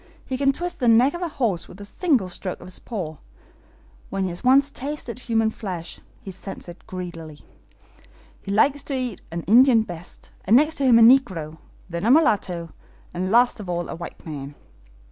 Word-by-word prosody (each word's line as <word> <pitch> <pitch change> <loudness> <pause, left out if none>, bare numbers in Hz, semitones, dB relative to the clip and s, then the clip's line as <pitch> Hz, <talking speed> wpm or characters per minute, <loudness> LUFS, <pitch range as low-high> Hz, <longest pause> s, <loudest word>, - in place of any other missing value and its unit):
He 260 - -3
can 275 +1 +3
twist 350 +5 -4
the 245 - +1
neck 235 +5 +5
of 345 - -6
a 350 - -1
horse 235 - -1
with 180 - -13
a 205 - -8
single 260 - +1
stroke 185 +1 -5
of - - -12
his 185 - -6
paw. 175 -10 -5 0.9
When 195 0 -2
he 185 - -1
has 175 - -9
once 275 +3 +4
tasted 270 -3 -6
human 225 -2 +1
flesh 180 -6 -6 0.2
he 195 - -9
scents 195 +1 -8
it 175 0 -12
greedily. 165 -4 -8 1.0
He - - -10
likes 270 +8 +3
to 275 - -3
eat 250 -6 -3
an 170 0 -5
Indian 235 +2 +6
best, 175 -4 -10
and 210 - +4
next 305 +4 +4
to 275 - +1
him 245 -3 +6
a 230 - +7
negro, 185 - +3 0.3
then 170 0 -5
a - - +4
mulatto, 200 - +2 0.4
and 185 +1 -2
last 240 +2 +4
of 195 -4 -7
all 175 0 -2
a - - -5
white 170 +1 -9
man." 145 -3 -7
210 Hz, 195 wpm, -23 LUFS, 175-255 Hz, 1.0 s, a